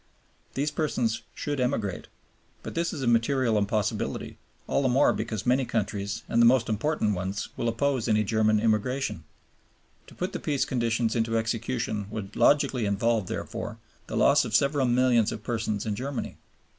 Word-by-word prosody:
These 145 +2 0
persons 125 -8 -1
should 145 -2 -3
emigrate, 115 -7 -1 0.6
but - - -6
this 170 0 -1
is 145 - -5
a - - 0
material 120 0 +2
impossibility, 105 0 -1 0.3
all - - +1
the 130 - +2
more 135 +4 +4
because 110 -1 -4
many 125 +2 +3
countries 105 -2 -2
and 115 - +2
the - - +7
most 120 -2 +3
important 110 0 0
ones 95 +2 -3
will 120 - -1
oppose 130 +1 0
any 105 0 +3
German 110 0 +2
immigration. 110 - 0 0.8
To - - -15
put 185 +2 -3
the 180 - -3
Peace 145 -3 0
conditions 115 -2 0
into 115 0 +1
execution 115 -2 -2
would 105 -2 -6
logically 135 -6 +3
involve, 105 0 +1
therefore, - - -5 0.3
the - - -3
loss - - +5
of 110 - -2
several 140 +1 +3
millions 120 -2 +3
of 105 - -6
persons 110 -2 -2
in 110 - -1
Germany. 135 +4 -4
115 Hz, 165 wpm, -27 LUFS, 110-130 Hz, 0.8 s, the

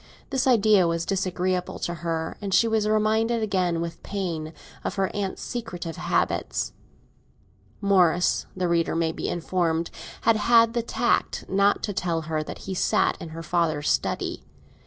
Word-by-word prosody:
This 265 0 +1
idea 215 -6 +5
was 165 0 -1
disagreeable 185 -1 -1
to 175 - -3
her, 165 -1 -3
and 195 -2 0
she 230 - +5
was 220 -1 +1
reminded 220 +2 +2
again, 185 -5 0
with 170 0 -5
pain, 170 -6 -3 0.3
of - - -3
her 195 -1 -1
aunt's 200 -2 -3
secretive 175 -9 -5
habits. - - -1 1.1
Morris, 180 -3 +3
the 185 -1 0
reader 170 -1 +1
may 165 -1 +1
be - - -4
informed, 170 -1 -1 0.3
had 225 0 +4
had 230 +1 +5
the 240 - +1
tact 235 +1 0
not 200 +1 +2
to 205 - -2
tell 170 -3 -1
her 155 0 -2
that 155 - -8
he 190 - -3
sat 185 - +2
in 165 - -6
her 165 +1 -7
father's 155 -3 0
study. - - -1
185 Hz, 155 wpm, -25 LUFS, 165-215 Hz, 1.1 s, idea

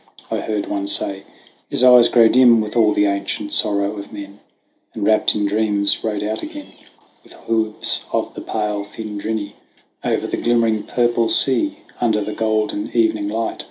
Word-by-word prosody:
I - - -1
heard 105 -2 -3
one 100 -1 -4
say 100 -1 +1 0.4
"his - - 0
eyes 125 -2 +7
grow 115 -2 +5
dim 120 -1 +5
With 105 0 -4
all 110 -3 +3
the 105 - +1
ancient 100 +1 -3
sorrow 100 0 +2
of 100 - -9
men;" 100 -1 -10 0.6
And - - -3
wrapped 110 0 +4
in 105 -1 -1
dreams 100 -1 +1
rode 105 -2 -3
out 110 +1 -3
again 300 -2 -9 0.5
With - - -16
hoofs 110 -1 0
of - - -2
the - - -8
pale 105 -1 -3
fmdrinny 105 0 -5 0.5
Over - - -1
the - - -3
glimmering 115 -2 +1
purple 120 -2 0
sea: 290 - +2 0.2
Under 110 -3 +1
the 105 +1 -5
golden 110 -1 -2
evening 110 -3 +1
light. 110 +1 -3
110 Hz, 165 wpm, -19 LUFS, 100-115 Hz, 0.6 s, eyes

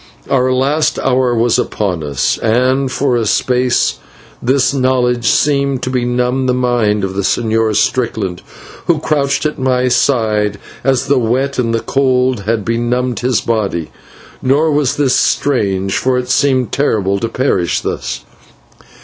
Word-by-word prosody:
Our 130 -1 +2
last 140 +5 +1
hour 125 -2 +1
was 115 0 +2
upon 90 -6 -2
us, 70 -2 -1
and 130 +4 +1
for 135 -1 0
a 115 -2 0
space 125 +2 +1 0.4
this 130 +2 +2
knowledge 125 -3 +1
seemed 140 0 +1
to 130 - -2
benumb 125 +1 0
the 125 - +1
mind 120 -5 +1
of 95 0 -2
the 100 - -2
Señor 110 +1 0
Strickland, 110 -9 -1 0.5
who 170 - +3
crouched 145 -1 0
at 150 - -2
my 130 -1 +1
side, 105 -5 +1 0.3
as 135 -1 +1
the 140 -1 +2
wet 130 +4 -1
and 115 -2 -1
cold 130 -2 +1
had 110 -1 -1
benumbed 120 +2 -1
his 125 -1 0
body. 100 -8 -2 0.5
Nor 145 +5 +2
was 145 -3 0
this 140 -3 +2
strange, 100 -8 0
for 130 -1 +1
it 125 0 -3
seemed 130 -4 +1
terrible 100 -8 0
to 115 - -2
perish 115 - 0
thus. 65 -1 -4
125 Hz, 145 wpm, -15 LUFS, 110-130 Hz, 0.5 s, who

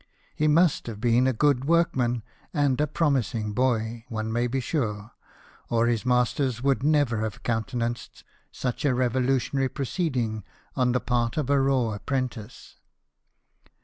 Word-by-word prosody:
He 155 - +1
must 160 -1 +3
hav<i 110 -3 -6
been 120 +2 +3
a - - +3
good 135 +1 +2
workman 130 -8 +1 0.3
and 145 -2 +2
a 150 - +2
promising 130 -9 0
boy, 115 -1 0
one 110 -1 -3
may 120 +1 +1
be 135 +2 -1
sure, 115 -6 -2 0.6
or 115 0 +2
his 120 +1 0
masters 125 0 +1
would 135 -1 +2
never 145 -6 +2
have 110 -1 -4
countenanced 120 0 -3 0.3
such 125 -2 -3
a 140 -4 +2
revolutionary 130 +2 +1
proceeding 125 - -2 0.3
on 125 -2 +2
the 125 - +2
part 120 0 -1
of 145 -3 0
a 140 -1 +4
raw 130 -4 +2
apprentice. 125 0 -5
125 Hz, 145 wpm, -26 LUFS, 115-135 Hz, 0.6 s, a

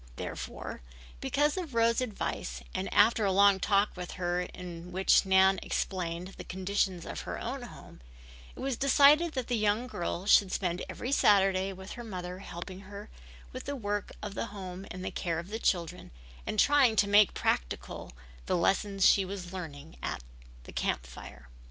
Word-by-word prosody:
Therefore, - - -6 0.4
because 295 - +1
of 330 -9 -5
Rose's 230 +1 +3
advice 65 - -4
and - - -3
after 225 -1 +4
a 195 - +2
long 200 0 +5
talk 200 +2 +2
with 180 -1 -6
her 180 -1 -1
in 180 -1 -8
which 190 +1 +3
Nan 190 0 +5
explained 180 -1 -3
the - - -5
conditions 190 -1 -1
of - - -5
her - - -5
own - - -4
home, - - -12 0.5
it - - -12
was 270 -3 -1
decided 290 +4 +5
that 260 -3 -2
the 245 - 0
young 215 +2 +1
girl 175 -5 -4
should 200 -2 +5
spend 180 -2 -1
every 250 - -4
Saturday 195 -5 +4
with 190 0 -9
her 240 - -7
mother 180 -4 -6
helping 185 0 -8
her 200 +2 -10 0.4
with 255 - -7
the 285 - -3
work 205 -4 -3
of 210 -1 -5
the 230 - -3
home 190 -2 -8
and 185 0 -7
the - - -3
care 170 -2 -2
of 170 +3 -6
the 220 +2 -4
children, 175 -7 -1 0.4
and 215 - -1
trying 275 -4 +5
to 205 - +3
make 205 0 +5
practical - - -2 0.4
the - - +1
lessons 195 +2 +2
she 195 - +5
was 185 -1 -6
learning 160 -4 -8
in - - -2 0.5
the - - -12
Camp - - -1
Fire. - - -11
195 Hz, 175 wpm, -30 LUFS, 180-215 Hz, 0.5 s, long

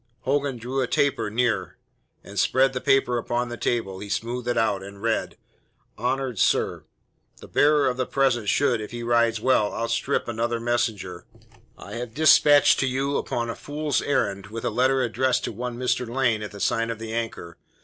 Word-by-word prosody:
Hogan 140 -1 0
drew 125 +4 -3
a 125 - 0
taper 140 -6 +1
nearer, 110 -5 -1 0.5
and - - -5
spreading 130 0 +3
the 130 - -3
paper 135 -3 +2
upon 120 +1 -2
the 120 - -5
table, 110 -5 -2
he 105 - -8
smoothed 120 +4 -3
it 120 - 0
out, 105 -4 +1
and 100 +1 -10
read: 115 +1 -1 0.6
HONOURED 125 -2 -2
SIR, - - +1 0.5
The - - -13
bearer 150 0 +3
of 125 -1 -1
the 130 - -1
present 120 -6 +1
should, 125 -5 +2
if 105 - -6
he 120 0 -6
rides 115 -1 +2
well, 110 -3 +2
outstrip 115 0 -1
another 120 0 -1
messenger 115 -7 -2 0.5
I - - -10
have 120 -1 -6
dispatched 145 -1 +6
to 135 - +1
you 135 +2 -1
upon 120 -1 -2
a - - -7
fool's 150 -1 -2
errand, 100 -8 -1
with 115 +2 -6
a - - 0
letter 130 +3 +2
addressed 125 +2 0
to - - -3
one 120 +2 -5
Mr. 125 -1 -1
Lane 120 -3 +1
at 105 - -5
the 100 - -11
sign 115 +3 0
of 115 - -3
the 110 0 -7
Anchor. 115 -7 -5
120 Hz, 190 wpm, -24 LUFS, 115-130 Hz, 0.6 s, dispatched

